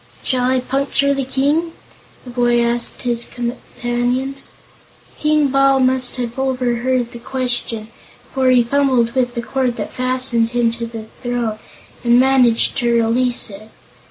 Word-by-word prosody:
"Shall 250 -1 +1
I 260 -1 +2
puncture 275 +2 +1
the 275 -1 -2
King?" 290 +6 0 0.5
the 250 - -9
boy 240 -1 +2
asked 235 +2 -1
his 240 -1 +1
companions. 245 +2 -3 0.7
King 300 -1 +2
Bal 275 0 +4
must 255 -1 +2
have 245 0 -4
overheard 250 -1 0
the 235 - -9
question, 240 -3 -2 0.5
for 265 -1 +2
he 250 -1 +5
fumbled 255 -2 +2
with 250 -2 0
the 235 - -3
cord 255 -1 -1
that - - -5
fastened 255 -2 0
him 235 -1 +3
to 235 0 -5
the 225 -1 -8 0.2
throne 240 -3 -2 0.4
and 240 0 +5
managed 255 -3 +3
to 240 -3 +1
release 235 0 +1
it. 210 +2 -11
250 Hz, 145 wpm, -18 LUFS, 235-265 Hz, 0.7 s, he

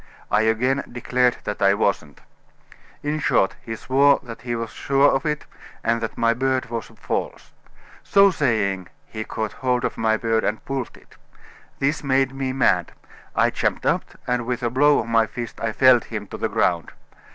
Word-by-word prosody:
I 105 - +4
again 125 +5 +1
declared 125 0 +1
that 105 - -5
I 100 0 +5
wasn't. 100 -8 -1 0.8
In 150 +1 -1
short, 95 -8 +2
he 115 -2 -6
swore 140 +4 +3
that 115 -2 -9
he 120 0 -3
was 115 -1 -4
sure 140 +1 +3
of 135 +2 0
it, 150 -1 -2 0.4
and 115 0 +1
that 115 - -4
my 115 0 +3
beard 130 0 -1
was 115 -3 -4
false. - - -4 0.5
So 200 0 +5
saying, 105 - 0 0.2
he 110 0 -6
caught 110 -1 -4
hold 125 -2 0
of - - -3
my 110 0 +2
beard 115 0 0
and 110 - -2
pulled 135 -3 -4
it. - - -21 0.6
This 150 +3 0
made 135 -1 +1
me 135 -1 -2
mad. 130 0 +1 0.4
I - - +3
jumped - - -1
up, - - +1 0.2
and 125 -1 -1
with 125 0 -2
a 120 - 0
blow 145 +3 +4
of - - -1
my 115 -1 +2
fist 120 0 -7
I 115 - 0
felled 130 +1 +5
him 110 -2 -5
to - - -7
the - - -1
ground. 85 -3 0
120 Hz, 185 wpm, -22 LUFS, 110-135 Hz, 0.8 s, I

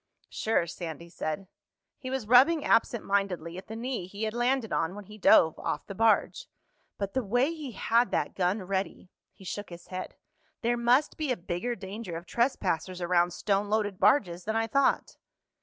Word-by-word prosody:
"Sure," 220 -6 +1
Sandy 170 -1 -7
said. 170 +2 -4 0.5
He 255 - -6
was 265 -4 -2
rubbing 270 +7 +5
absent 230 0 +2
mindedly 185 -4 -1
at 190 - -14
the 220 - -7
knee 235 -5 -4
he 200 +3 -6
had 215 -1 -1
landed 240 -2 0
on 165 +3 0
when 205 - -8
he 215 +2 -13
dove 160 -4 +5
off 150 - -3
the 195 - -7
barge. 225 +2 +2 0.5
"But 200 -1 -3
the 260 - +1
way 245 +9 +1
he 295 -7 -7
had 235 +4 +2
that - - -1
gun 190 +2 0
ready—" 190 -1 -3 0.2
He 190 - -16
shook 205 +3 -5
his 170 -1 -11
head. 185 0 -6 0.5
"There 240 +1 +2
must 245 +5 +2
be 305 -4 -1
a 250 - 0
bigger 180 +7 -3
danger 195 -3 -6
of 170 - -9
trespassers 185 - -1
around 175 0 +2
stone 200 +1 0
loaded 205 -3 0
barges 185 -5 +3
than 220 +1 -1
I 225 0 +2
thought." 275 +5 +1
205 Hz, 185 wpm, -28 LUFS, 180-240 Hz, 0.5 s, rubbing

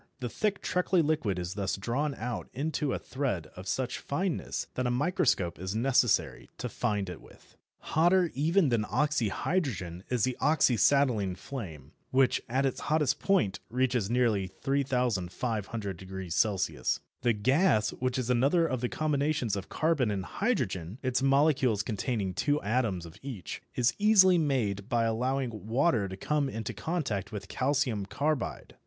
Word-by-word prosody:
The 125 -2 -3
thick 210 - -1
treacly 180 -1 +2
liquid 145 - 0
is 90 0 -3
thus 100 -2 -1
drawn 135 +8 -1
out 120 0 -4
into 145 0 -1
a - - 0
thread 130 - -3
of 90 +1 -9
such 125 +4 -2
fineness 175 +4 -2
that 125 -1 -1
a - - +1
microscope 125 - +1
is 95 +3 -4
necessary 125 -1 +2
to - - -4
find 105 -5 -1
it 90 -2 -7
with. - - -19 0.4
Hotter 175 +2 +4
even 160 +3 +2
than 115 -3 +1
oxyhydrogen 120 - -1
is 125 -4 0
the 130 0 +1
oxyacetylene 125 - +3
flame, 85 - -8 0.2
which 130 0 +3
at 135 +3 +1
its 135 - -1
hottest 150 -3 +2
point 180 - +1
reaches 125 -4 0
nearly 115 -6 +1
3500° 100 - -1
C. - - -2 0.4
The 120 - +3
gas, 110 - +2
which 130 +1 -2
is 125 -1 -1
another 140 +8 +3
of 130 -6 -2
the 125 - -1
combinations 145 -7 0
of 95 -1 -6
carbon 155 -7 +1
and 95 -3 -2
hydrogen 105 - -2
(its 130 0 +1
molecules 135 -6 +3
containing 105 -2 -2
two 145 - +1
atoms 105 -6 0
of 80 - -12
each), 125 -9 -6
is 120 -1 +2
easily 190 -4 +6
made 115 -9 0
by 120 -2 +2
allowing 115 -2 -1
water 115 -3 +2
to 95 - -7
come 145 +5 0
into 110 -2 -4
contact 130 - -2
with 100 -2 -6
calcium 130 -7 0
carbide. 145 +3 -2
125 Hz, 150 wpm, -29 LUFS, 100-145 Hz, 0.4 s, easily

